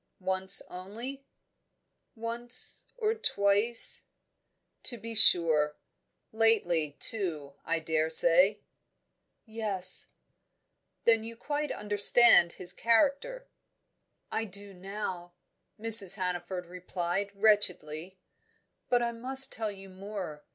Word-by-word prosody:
"Once 190 0 +3
only?" 230 +10 -8 0.9
"Once 235 +2 -4
or 440 -2 -1
twice 205 - 0 0.4
" - - -53
"To 240 - -1
be 230 +1 -9
sure. 160 -8 +4 0.5
Lately, 175 -10 0
too, 165 - -2
I 165 - -2
daresay?" 165 +5 +4 0.8
"Yes 210 -5 -5 0.5
" - - -53
"Then 225 -1 +3
you 230 +1 -9
quite 295 +4 -5
understand 205 -3 +4
his 180 - -5
character?" 280 - -1 0.8
"I 225 - -3
do 200 0 -12
now," 180 -2 -8 0.4
Mrs. 215 -4 +6
Hannaford 180 -1 -5
replied 180 +2 -5
wretchedly. 185 -5 -1 0.7
"But 245 -1 +1
I 235 - -3
must 260 +3 +3
tell 220 -2 -5
you 195 -1 -14
more. 190 -5 -9
200 Hz, 100 wpm, -27 LUFS, 180-230 Hz, 0.9 s, Mrs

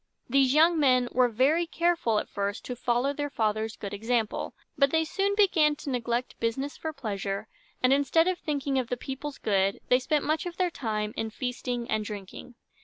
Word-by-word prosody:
These 275 0 +3
young 325 +1 +5
men 255 -4 +3
were 250 -1 +3
very 285 +9 +2
careful 335 -10 +1
at - - -1
first 200 +1 -3
to 250 - -4
follow 245 +3 0
their 290 0 -3
father's 220 -3 -1
good 200 -1 -7
example; 225 +1 -1 0.2
but 280 -2 +4
they 320 +2 +2
soon 395 +5 0
began 330 -8 +4
to 290 -1 -6
neglect 240 0 -2
business 265 +5 -2
for 315 - -4
pleasure, 205 -6 -4 0.4
and, 255 +1 +5
instead 285 +4 +3
of 370 -1 0
thinking 280 -3 -1
of 250 - -2
the 245 - -2
people's 270 +3 -6
good, 195 -1 +1
they 250 - +5
spent 295 +3 0
much 310 +3 0
of 345 - -7
their 360 -2 +1
time 215 -6 -3
in 225 - -2
feasting 245 0 -3
and 215 -2 0
drinking. 205 +3 -8
255 Hz, 190 wpm, -28 LUFS, 225-300 Hz, 0.4 s, young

